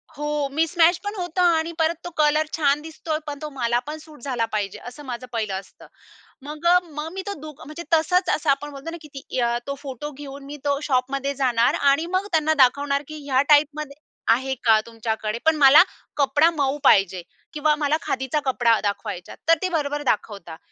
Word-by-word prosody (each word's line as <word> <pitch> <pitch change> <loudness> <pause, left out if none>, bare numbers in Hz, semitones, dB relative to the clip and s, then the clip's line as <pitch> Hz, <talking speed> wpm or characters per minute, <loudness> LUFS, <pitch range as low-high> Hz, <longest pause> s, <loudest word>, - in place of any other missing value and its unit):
हो, 295 0 -2
मिसमॅच 330 +2 +3
पण 410 +1 -4
होतं 360 -2 -2
आणि 335 -2 +3
परत 325 +1 +2
तो - - -4
कलर 305 0 +3
छान 290 -1 +2
दिसतोय, 315 0 -4
पण 290 -1 -5
तो 305 - -5
मला 240 -1 +1
पण 305 +1 -5
सूट 310 -3 -15
झाला 245 -3 -1
पाहिजे, 205 -2 -2
असं 250 +4 -10
माझं 255 -1 -6
पहिलं 215 -4 -2
असतं. 190 -1 -16 0.6
मग 300 +3 -8
अ, 355 +1 +7
मग 310 -1 -7
मी 385 - -4
तो 405 - -2
दु 310 0 -7
म्हणजे 305 +4 -8
तसंच 350 +3 +3
असं 305 - -3
आपण 275 +1 +1
म्हणतो 280 +3 -8
ना 340 - -6
की 305 - -12
ती 270 -1 -5 0.3
तो 280 - -3
फोटो 285 +1 -6
घेऊन 280 0 -10
मी 290 +1 -8
तो 280 -1 +1
शॉपमध्ये 275 +2 0
जाणार 245 -3 +2
आणि 280 +3 +3
मग 395 +2 -3
त्यांना 315 -2 +2
दाखवणार 280 +2 +1
की, 310 - -8
"ह्या 265 -2 +3
टाइपमध्ये 295 -1 +3 0.4
आहे 265 +3 -1
का 225 -2 +5
तुमच्याकडे? 225 -1 -3
पण 320 0 +4
मला 290 0 +8 0.4
कपडा 290 +3 +4
मऊ 280 -1 0
पाहिजे 190 -2 +4 0.3
किंवा 300 0 +2
मला 300 0 +1
खादीचा 265 +3 -1
कपडा 240 -4 +3
दाखवा 200 -1 -2
ह्याच्यात." 175 0 -9
तर 330 - +6
ते 370 - 0
बरोबर 295 -4 -1
दाखवतात. 200 - -2
290 Hz, 195 wpm, -23 LUFS, 255-310 Hz, 0.6 s, मला